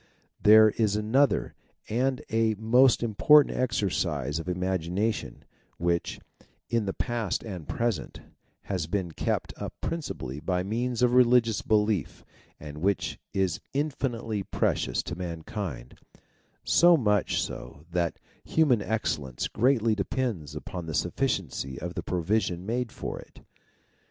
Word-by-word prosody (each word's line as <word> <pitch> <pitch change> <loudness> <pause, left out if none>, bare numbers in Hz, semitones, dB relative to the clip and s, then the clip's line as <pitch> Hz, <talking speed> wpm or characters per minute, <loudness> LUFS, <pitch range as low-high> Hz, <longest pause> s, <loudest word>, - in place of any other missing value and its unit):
There 110 +1 +8
is 105 -3 +1
another 115 +7 +2 0.3
and 130 +3 0
a 110 -1 +2
most 120 +4 +4
important 135 +7 +5
exercise 85 - -1
of 80 - -5
imagination 90 +2 -2 0.3
which, 85 0 -1 0.5
in 115 -3 +1
the 95 - -1
past 120 -5 -2
and 90 -8 -7
present, 115 -2 -2 0.4
has 90 -5 -3
been 90 -1 -2
kept - - -2
up - - -6
principally 70 - -4
by 90 +4 -1
means 120 +4 -1
of 125 0 +4
religious 120 -3 +4
belief 105 -4 0 0.3
and 75 0 -8
which 100 +4 -1
is 95 -1 0
infinitely 125 -7 -2
precious - - -1
to 85 - -5
mankind, 85 - -6 0.6
so 175 0 +6
much 105 -6 +1
so 75 +2 -6
that 85 -1 0 0.3
human 145 -9 +3
excellence 75 - -2
greatly 115 -2 +2
depends 105 - -2
upon 90 -3 -6
the 80 - -3
sufficiency 90 - -1
of 85 +1 -5
the - - -3
provision 90 0 -1
made 120 +2 -2
for - - -5
it. - - -15
105 Hz, 125 wpm, -27 LUFS, 85-120 Hz, 0.6 s, There